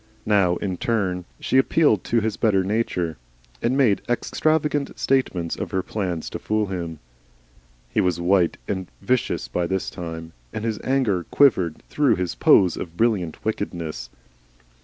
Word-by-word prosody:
Now 100 Hz, -4 st, +3 dB
in 95 Hz, -1 st, -3 dB
turn 95 Hz, -6 st, -1 dB
she 130 Hz, -, +2 dB
appealed 130 Hz, -, +3 dB
to 115 Hz, -1 st, +2 dB
his 110 Hz, -1 st, -1 dB
better 100 Hz, -5 st, +2 dB
nature 90 Hz, -6 st, -1 dB, 0.4 s
and 125 Hz, +3 st, +1 dB
made 120 Hz, -8 st, +3 dB
extravagant 150 Hz, +3 st, 0 dB
statements 95 Hz, -11 st, 0 dB
of -, -, -4 dB
her 95 Hz, -1 st, -1 dB
plans 90 Hz, -6 st, -3 dB
to -, -, -5 dB
fool 110 Hz, 0 st, 0 dB
him. 85 Hz, -4 st, -4 dB, 0.9 s
He -, -, +1 dB
was 90 Hz, -2 st, +1 dB
white 90 Hz, -1 st, +2 dB
and 95 Hz, -3 st, -3 dB, 0.2 s
vicious 130 Hz, -1 st, 0 dB
by 85 Hz, -1 st, -1 dB
this 95 Hz, +1 st, -2 dB
time, 80 Hz, -1 st, -7 dB, 0.2 s
and 110 Hz, -, -4 dB
his 110 Hz, -2 st, -1 dB
anger 115 Hz, -10 st, +1 dB
quivered 95 Hz, -, +3 dB
through 145 Hz, -3 st, +2 dB
his 90 Hz, -1 st, -2 dB
pose 90 Hz, -3 st, +4 dB
of 85 Hz, -1 st, -7 dB
brilliant 100 Hz, -8 st, 0 dB
wickedness. 85 Hz, -, -3 dB
95 Hz, 150 wpm, -23 LUFS, 85-115 Hz, 0.9 s, pose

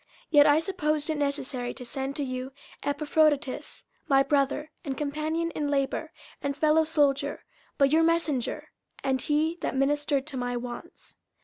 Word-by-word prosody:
50:002:025 -, -, -37 dB, 0.2 s
Yet 290 Hz, -2 st, +7 dB
I 290 Hz, 0 st, +6 dB
supposed 310 Hz, -4 st, 0 dB
it 310 Hz, -, -2 dB
necessary 280 Hz, -3 st, -2 dB
to 250 Hz, -, -8 dB
send 270 Hz, +2 st, -3 dB
to 290 Hz, -, -1 dB
you 255 Hz, 0 st, -4 dB, 0.3 s
Epaphroditus, 295 Hz, -1 st, 0 dB, 0.2 s
my 275 Hz, -1 st, +5 dB
brother, 285 Hz, +2 st, 0 dB
and 275 Hz, -5 st, -4 dB
companion 310 Hz, +3 st, -1 dB
in 295 Hz, -2 st, -2 dB
labour, 275 Hz, -1 st, -1 dB, 0.3 s
and 280 Hz, 0 st, -2 dB
fellowsoldier, 305 Hz, -3 st, +2 dB, 0.4 s
but 275 Hz, -1 st, +4 dB
your 320 Hz, +1 st, +5 dB
messenger, 325 Hz, -6 st, 0 dB, 0.3 s
and 265 Hz, -1 st, +1 dB
he 315 Hz, +3 st, 0 dB
that -, -, -2 dB
ministered 280 Hz, 0 st, +1 dB
to 295 Hz, -3 st, -4 dB
my 245 Hz, -1 st, -2 dB
wants. 240 Hz, 0 st, -8 dB
290 Hz, 150 wpm, -27 LUFS, 270-305 Hz, 0.4 s, Yet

